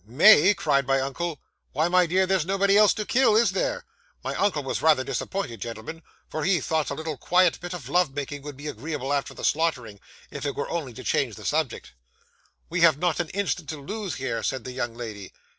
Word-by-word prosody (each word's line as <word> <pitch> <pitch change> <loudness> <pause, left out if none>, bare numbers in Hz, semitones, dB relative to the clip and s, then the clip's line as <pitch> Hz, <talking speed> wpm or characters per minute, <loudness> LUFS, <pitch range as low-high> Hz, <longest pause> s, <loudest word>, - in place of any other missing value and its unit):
'"May!" 170 - +6
cried 140 -6 +1
my 135 0 +3
uncle; 145 +4 -3 0.3
"why, 155 +4 +2
my 180 0 +3
dear, 185 +3 +2
there's 190 -3 +1
nobody 195 +3 +2
else 210 0 +6
to 215 -2 -3
kill, 255 -3 +3
is 230 +2 +4
there?" - - -2 0.4
My - - -3
uncle 175 -8 0
was 135 - -3
rather 155 -5 +4
disappointed, 130 - -4
gentlemen, 115 +8 -7 0.3
for 155 - -4
he 185 -1 +3
thought 155 +1 -1
a 140 - -3
little 160 -1 -5
quiet 180 +6 +3
bit 175 0 -5
of 145 -9 -8
love 170 -2 +1
making 145 0 -4
would 145 -1 -9
be 145 - -10
agreeable 145 +1 -4
after 140 -1 -2
the - - -5
slaughtering, 130 -10 0 0.3
if - - -7
it 140 -1 -2
were 145 - -4
only 150 -8 -3
to - - -9
change 120 -7 0
the - - -11
subject. 155 -4 -1 0.8
'"We 170 +1 -2
have 165 -4 +6
not 175 0 0
an 170 -3 -2
instant 185 -6 -2
to 155 - -4
lose 195 +4 -5
here," 130 -3 -3
said 130 -3 -2
the 130 - -6
young 120 -2 -4
lady. 110 -5 -8
155 Hz, 215 wpm, -25 LUFS, 135-180 Hz, 0.8 s, May